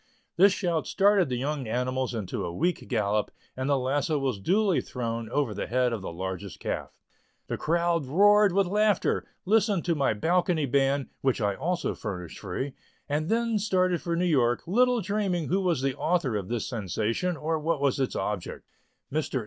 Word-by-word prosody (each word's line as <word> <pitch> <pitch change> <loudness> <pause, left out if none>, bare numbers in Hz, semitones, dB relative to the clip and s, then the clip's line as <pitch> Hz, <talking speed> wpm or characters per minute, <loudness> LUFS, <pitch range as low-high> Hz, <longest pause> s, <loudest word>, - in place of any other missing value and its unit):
This 195 +3 +6
shout 175 -5 -1
started 200 -5 +3
the 125 - -1
young 140 0 -2
animals 125 +2 -1
into 105 -5 -3
a - - -3
weak 170 - -1
gallop 105 -3 0 0.3
and 130 +2 -2
the 140 - +3
lasso 140 +4 0
was 135 -7 -1
duly 195 - +2
thrown 115 -2 -4
over 140 -7 0
the - - -4
head 125 0 +1
of 110 - -3
the 95 - -5
largest 95 +2 -5
calf. - - -4 0.5
The - - -3
crowd 170 -2 +1
roared 205 +6 +5
with 195 +2 +3
laughter, 210 +1 +1 0.2
listened 205 -2 +2
to 170 - +2
my 140 -7 +1
balcony 170 - +1
band, 135 +1 +1
which 130 -2 +1
I 100 -3 +1
also 175 - -1
furnished 90 -6 -6
"free," 120 +8 -4 0.3
and 150 +2 -1
then 230 -1 +1
started 185 -4 +1
for 170 -1 -2
New 175 +2 +1
York, 125 -8 +2
little 245 +5 +3
dreaming 195 -4 -1
who 190 +3 +2
was 170 -8 0
the 135 -1 0
author 160 -9 0
of 100 -3 -3
this 120 -2 -2
sensation, 115 - -2
or 155 +3 -1
what 160 0 0
was 140 -1 +1
its 130 - -1
object. 105 -4 -4 0.5
Mr. 150 -3 -1
145 Hz, 180 wpm, -27 LUFS, 120-180 Hz, 0.5 s, This